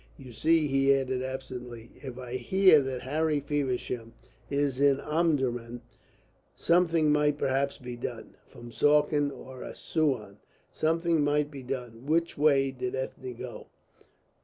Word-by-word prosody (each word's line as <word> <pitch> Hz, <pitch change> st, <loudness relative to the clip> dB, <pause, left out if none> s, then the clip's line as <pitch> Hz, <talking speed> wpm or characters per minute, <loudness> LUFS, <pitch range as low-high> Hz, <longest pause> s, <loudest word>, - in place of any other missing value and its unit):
"You 130 Hz, -3 st, -11 dB
see," 160 Hz, +5 st, +3 dB
he 135 Hz, -1 st, +3 dB
added 130 Hz, -1 st, -1 dB
absently, 125 Hz, -3 st, -7 dB
"if 130 Hz, -3 st, -8 dB
I 125 Hz, -1 st, -7 dB
hear 155 Hz, +5 st, +5 dB
that 130 Hz, -2 st, -4 dB
Harry 150 Hz, +3 st, 0 dB
Feversham 130 Hz, -5 st, -3 dB, 0.4 s
is 140 Hz, -2 st, 0 dB
in 140 Hz, -1 st, +4 dB
Omdurman, 130 Hz, -7 st, -1 dB, 0.7 s
something 165 Hz, -3 st, +3 dB
might 150 Hz, -1 st, +2 dB
perhaps 140 Hz, 0 st, 0 dB
be 125 Hz, -1 st, -7 dB
done -, -, -6 dB
from 120 Hz, 0 st, -12 dB
Suakin 145 Hz, +2 st, +3 dB
or 130 Hz, -2 st, -10 dB
Assouan, 130 Hz, -11 st, -2 dB, 0.3 s
something 165 Hz, 0 st, +1 dB
might 145 Hz, 0 st, +1 dB
be 140 Hz, -2 st, -8 dB
done. 125 Hz, -1 st, -6 dB
Which 165 Hz, +2 st, +1 dB
way 140 Hz, -2 st, +3 dB
did 125 Hz, -1 st, -4 dB
Ethne 130 Hz, -1 st, -5 dB
go?" 125 Hz, 0 st, -8 dB
135 Hz, 135 wpm, -28 LUFS, 125-150 Hz, 0.7 s, hear